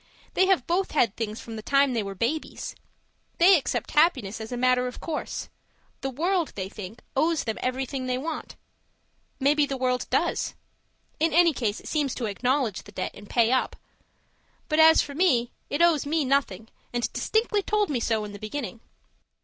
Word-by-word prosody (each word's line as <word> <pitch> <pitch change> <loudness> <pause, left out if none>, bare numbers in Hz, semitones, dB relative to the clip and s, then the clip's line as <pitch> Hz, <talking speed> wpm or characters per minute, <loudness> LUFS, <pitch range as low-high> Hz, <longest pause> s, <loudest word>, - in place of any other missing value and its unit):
They 375 - +3
have 375 -10 +3
both 365 +3 0
had 230 -8 +2
things 220 -1 -4
from 225 -1 -8
the - - -5
time 275 +3 +3
they 230 - +1
were 195 -1 -5
babies; 245 +10 -3 0.6
they 370 +3 +7
accept 295 - -1
happiness 265 - +2
as 220 - -7
a 245 - -3
matter 250 0 +3
of 250 - -7
course. 320 -2 -4 0.5
The 270 - -2
World, 340 +5 0
they 190 -1 -4
think, 205 +2 -9
owes 315 +3 +2
them 220 -2 -3
everything 255 +1 -2
they 250 0 0
want. 310 +4 -5 0.8
Maybe 290 +2 +3
the 275 - -3
World 250 -1 0
does - - 0 0.6
in 320 0 +2
any 340 0 +5
case, 220 -6 -1
it - - -12
seems 290 -4 0
to 245 - -3
acknowledge 245 0 0
the 205 - -14
debt - - -3
and 205 0 -13
pay 235 -1 +3
up. 260 - +1 0.9
But 305 0 +1
as 320 0 +7
for 285 - -8
me, 270 -8 +2 0.2
it 290 +4 +2
owes 315 -4 +3
me 310 -1 +1
nothing, 245 -6 0 0.2
and 240 -1 -2
distinctly 440 -2 +1
told 415 -2 0
me 255 - 0
so 225 -2 0
in 205 - -8
the 205 - -9
beginning. 225 -1 -5
265 Hz, 185 wpm, -26 LUFS, 230-315 Hz, 0.9 s, they